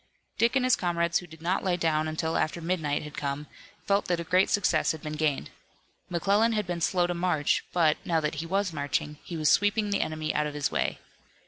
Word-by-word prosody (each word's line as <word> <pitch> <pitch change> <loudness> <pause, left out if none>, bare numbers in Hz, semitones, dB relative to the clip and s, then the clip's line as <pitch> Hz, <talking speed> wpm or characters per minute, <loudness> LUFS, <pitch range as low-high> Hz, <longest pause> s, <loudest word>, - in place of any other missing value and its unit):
Dick 235 +3 +3
and 260 -2 +3
his 255 - +5
comrades 170 -1 0
who 180 - -11
did 160 0 -14
not 180 +3 0
lie 185 -2 +1
down 155 -2 +1
until 160 +1 -2
after 155 +2 0
midnight 160 -4 -1
had 150 0 -9
come, 140 +1 -3 0.4
felt 200 0 +2
that 175 -1 0
a - - -3
great 180 +3 +3
success 175 -7 +2
had 160 - -9
been 150 -1 -4
gained. 150 - -1 0.6
McClellan 200 +6 +2
had 210 -1 0
been 175 -1 -4
slow 180 +1 +2
to 175 - -1
march, 170 -4 +1
but, 160 -3 +3
now 165 -2 +1
that 150 -1 -1
he 165 - -6
was 195 0 0
marching, 150 0 -2
he 170 - -6
was 155 -2 +3
sweeping 205 +1 +2
the 200 - +1
enemy 155 0 -2
out 150 0 +1
of 150 - -7
his 145 -1 -1
way. - - 0
170 Hz, 225 wpm, -28 LUFS, 155-185 Hz, 0.6 s, his